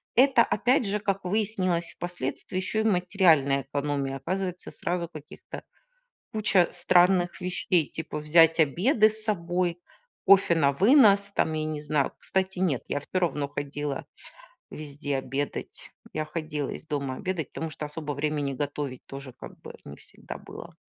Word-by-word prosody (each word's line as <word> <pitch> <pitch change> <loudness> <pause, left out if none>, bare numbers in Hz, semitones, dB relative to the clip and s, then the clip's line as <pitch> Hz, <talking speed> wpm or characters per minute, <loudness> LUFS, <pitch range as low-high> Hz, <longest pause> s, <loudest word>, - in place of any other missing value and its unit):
Это, 255 -1 +6
опять 245 +3 +2
же, 205 +1 -1
как 195 -1 -2
выяснилось 185 -4 -1
впоследствии, 175 0 -4
ещё 215 +4 -1
и - - 0
материальная 180 -8 +3
экономия. 140 0 -2
Оказывается, 180 +3 -4
сразу 175 0 -2
каких-то 155 -3 -10 0.7
куча 205 -4 +3
странных 180 0 +3
вещей, 180 -3 0
типа 160 -1 -5
взять 165 +2 +5
обеды 210 - +4
с 215 0 -6
собой, 175 -3 -1 0.4
кофе 195 -3 +6
на 140 -3 +3
вынос 200 - +5
там, 160 - +1
я 155 0 -2
не 155 -1 -4
знаю. 150 -2 0
Кстати, 190 -1 -2
нет, 160 -9 0
я 145 - -1
всё 185 +6 -3
равно 150 -5 0
ходила 145 0 -4 0.6
везде 145 -2 -4
обедать. 140 +2 -5 0.2
Я 155 0 -2
ходила 155 -2 -4
из - - -7
дома 140 -3 -2
обедать, 180 -3 -4
потому 160 - -4
что 150 0 -6
особо 150 0 -5
времени 145 -1 -1
готовить 140 -1 -4
тоже, 135 -1 -9
как - - -12
бы, - - -10
не 70 - -9
всегда - - -10
было. - - -11
165 Hz, 150 wpm, -27 LUFS, 145-190 Hz, 0.7 s, Это